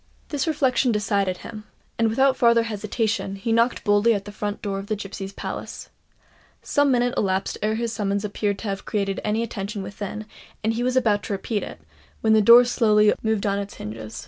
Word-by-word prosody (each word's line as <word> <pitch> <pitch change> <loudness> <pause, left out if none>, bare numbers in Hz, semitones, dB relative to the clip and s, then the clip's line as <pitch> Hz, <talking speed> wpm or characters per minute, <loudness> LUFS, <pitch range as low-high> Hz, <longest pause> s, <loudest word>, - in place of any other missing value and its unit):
This 290 0 -2
reflection 265 -5 +2
decided 200 -3 0
him; 215 -2 -8 0.4
and, 225 -1 +3
without 265 +4 +3
farther 235 -1 +4
hesitation, 215 -1 -2
he 200 +4 -3
knocked 230 +2 +2
boldly 205 +2 +3
at 200 -1 -4
the 205 - -8
front 205 0 -4
door 195 -2 -2
of 195 - -8
the 215 - -1
Gipsies' 195 -1 -7
Palace. - - -6 0.7
Some 285 0 +2
minutes 245 -1 +2
elapsed 190 -1 -1
ere 215 +1 0
his 230 0 -2
summons 200 -1 -1
appeared 205 -1 -1
to 220 - -6
have 195 -1 -3
created 195 -2 -2
any 215 +2 0
attention 200 -2 -5
within; 205 +2 -6 0.4
and 220 +1 +1
he 230 - -2
was 250 +1 0
about 215 -5 +2
to - - -3
repeat 205 +2 -2
it, - - -8 0.4
when 220 -1 +3
the 215 - +5
door 235 +4 +8
slowly 215 -3 +4
moved 220 -2 0
on 200 0 +1
its 200 0 -6
hinges. 110 0 -7
210 Hz, 200 wpm, -23 LUFS, 200-230 Hz, 0.7 s, door